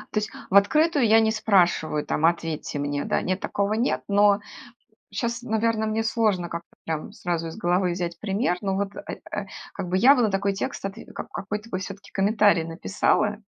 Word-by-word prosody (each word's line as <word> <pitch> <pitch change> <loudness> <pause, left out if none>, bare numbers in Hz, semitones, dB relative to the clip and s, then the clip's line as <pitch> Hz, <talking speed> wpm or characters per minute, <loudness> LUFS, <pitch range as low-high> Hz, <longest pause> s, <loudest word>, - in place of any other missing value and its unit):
есть 215 0 0 0.2
в 195 - -1
открытую 290 +7 +4
я 220 +1 +6
не 220 0 +3
спрашиваю, 180 -8 +2
там: 155 - 0
"Ответьте 165 -3 -1
мне", 145 0 -2
да. - - 0
Нет, 185 +1 -1
такого 200 +2 -1
нет, 235 +4 0
но 205 0 +4 0.7
щас, 235 -1 -2
наверно, 220 -1 0
мне 220 +1 0
сложно 215 -6 +1
как-то 170 0 -7 0.2
прям 160 -1 -3
сразу 170 -2 -3
из 165 - -8
головы 180 -2 +1
взять 175 -1 -3
пример, 195 -3 0
ну 195 -1 -1
вот, 200 0 -2
э, - - -7
э, 205 - -3 0.3
как 180 - -5
бы 185 - +1
я 260 +8 +7
бы 250 - +2
на 215 -4 +2
такой 200 +1 0
текст, 195 - -4
отв 195 +2 -5 0.2
как - - -6
какой-то 210 +3 -5
бы 185 - -2
всё-таки 195 +1 -8
комментарий 205 -3 +3
написала, 200 +5 0
200 Hz, 190 wpm, -25 LUFS, 175-220 Hz, 0.7 s, я